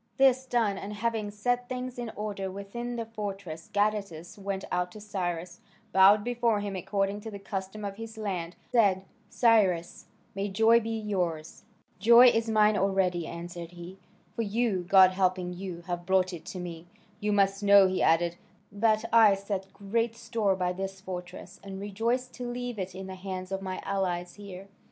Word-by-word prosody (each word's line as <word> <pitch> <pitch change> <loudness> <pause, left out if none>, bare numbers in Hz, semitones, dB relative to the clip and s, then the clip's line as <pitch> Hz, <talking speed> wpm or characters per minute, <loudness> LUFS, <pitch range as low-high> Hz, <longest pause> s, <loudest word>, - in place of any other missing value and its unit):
This 260 -1 +4
done, 225 -6 +1
and 205 +1 -6
having 220 -1 -2
set 245 +4 -1
things 250 0 -5
in 240 -2 -4
order 205 -2 -4
within 200 +6 -6
the 230 -1 -3
fortress, 200 -7 -6
Gadatas 205 -5 -1
went 195 -1 -4
out 180 0 -1
to 215 - -10
Cyrus, 180 -4 -4 0.3
bowed 195 +2 +7
before 235 -2 +1
him 200 -1 -4
according 195 +2 -1
to 220 - -7
the 205 - -7
custom 195 +1 -5
of 200 0 -5
his 225 0 -8
land, 180 -5 -4
and - - -34
said, 195 -5 +3 0.2
"Cyrus, 200 -9 +2 0.3
may 195 +1 -2
joy 225 +4 +5
be 225 -1 -5
yours!" 185 -8 -3 0.3
"Joy 235 +5 +8
is 225 -1 0
mine 215 -1 +4
already," 190 -3 +1
answered 170 0 -7
he, 175 +2 -10 0.4
"for - - -1
you, 210 -4 0
God 190 -1 +8
helping 185 -1 0
you, 180 -1 -6
have 175 0 -5
brought 190 -1 +2
it 165 -1 -8
to 185 - -6
me. 170 -1 -7 0.3
You 210 0 -1
must 195 -1 +2
know," 200 -1 +7
he 185 0 -1
added, 170 +1 +2 0.3
"that 215 +2 +2
I 220 -3 +7
set 195 -1 -5
great 230 +3 -1
store 225 -4 0
by 180 -1 -1
this 195 +1 -5
fortress, 180 -1 -8
and 195 -1 -7
rejoice 225 +6 -1
to 250 -1 -6
leave 245 -2 -4
it 185 -1 -4
in 190 0 -6
the 190 - -7
hands 185 0 -6
of 195 0 -2
my 185 -1 -4
allies 180 -3 -2
here. 195 -2 -10
195 Hz, 180 wpm, -28 LUFS, 185-220 Hz, 0.4 s, Joy